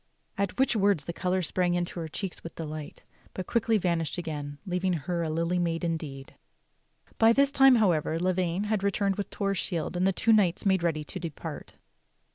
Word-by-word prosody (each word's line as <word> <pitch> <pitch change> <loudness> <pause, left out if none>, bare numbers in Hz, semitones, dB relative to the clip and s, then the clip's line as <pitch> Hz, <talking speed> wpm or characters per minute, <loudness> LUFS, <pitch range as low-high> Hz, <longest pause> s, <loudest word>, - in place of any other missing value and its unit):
At 200 +1 -2
which 265 -2 +2
words 200 -8 +2
the 170 - -4
color 185 +1 0
sprang 175 +1 0
into 175 0 -2
her 165 - -4
cheeks 185 +4 -6
with 165 - -8
delight, 155 -2 -7 0.3
but 185 - -4
quickly 225 +1 +2
vanished 170 -5 -1
again 145 -4 -5
leaving 180 0 0
her 170 +2 -2
a 165 - -1
Lily 165 +3 0
IMaid 170 0 -1
indeed. 155 -5 -4 0.9
By 225 0 +6
this 280 +2 +3
time, 270 -2 +6
however, 170 -8 +2
Lavaine 180 +1 0
had 210 -1 0
returned 200 -1 0
with 205 - -3
Torre's 195 -2 -1
shield, 170 -1 -2
and 180 +2 +2
the - - +4
two 225 +4 +2
knights 195 -4 +2
made 190 -2 +3
ready 160 -3 0
to 185 - -7
depart. 165 -5 -7
180 Hz, 190 wpm, -28 LUFS, 165-200 Hz, 0.9 s, By